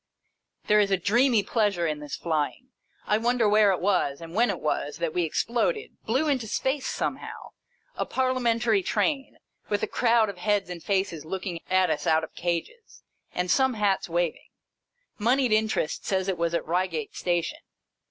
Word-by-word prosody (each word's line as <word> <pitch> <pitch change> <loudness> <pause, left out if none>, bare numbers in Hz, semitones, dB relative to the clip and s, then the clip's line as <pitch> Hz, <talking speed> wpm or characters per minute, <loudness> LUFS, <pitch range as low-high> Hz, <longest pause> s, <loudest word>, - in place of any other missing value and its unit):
There 210 0 +4
is 205 -1 +3
a 195 - +3
dreamy 225 +4 +3
pleasure 205 -7 +1
in 155 -2 -1
this 150 -1 -6
flying. 160 - -2 0.4
I 210 - +2
wonder 240 -1 +2
where 210 -1 +5
it 185 - 0
was, 180 -8 +1
and 165 0 -9
when 235 +5 +3
it - - -2
was, 150 -1 -2
that 170 -1 -2
we 180 - +1
exploded, 240 - 0 0.2
blew 260 +8 +1
into 260 -6 0
space 265 +5 -1
somehow, - - -4 0.4
a - - -2
Parliamentary 240 -4 +1
Train, 270 - -1 0.3
with 205 -1 0
a - - +1
crowd 230 -2 +3
of 200 -3 -7
heads 200 -1 0
and 175 -1 -6
faces 190 -4 -1
looking 180 0 -5
at 185 0 +3
us - - -2
out 160 0 +3
of 160 - -7
cages, 175 - -4 0.3
and 180 0 0
some 265 -2 +3
hats 200 -4 0
waving. 170 -1 -1 0.7
Monied 245 +3 +2
Interest 215 -7 +1
says 190 -1 -1
it 190 - 0
was 170 0 -1
at - - -1
Eeigate 170 -3 -1
Station. 175 -2 -1
200 Hz, 170 wpm, -26 LUFS, 170-235 Hz, 0.7 s, where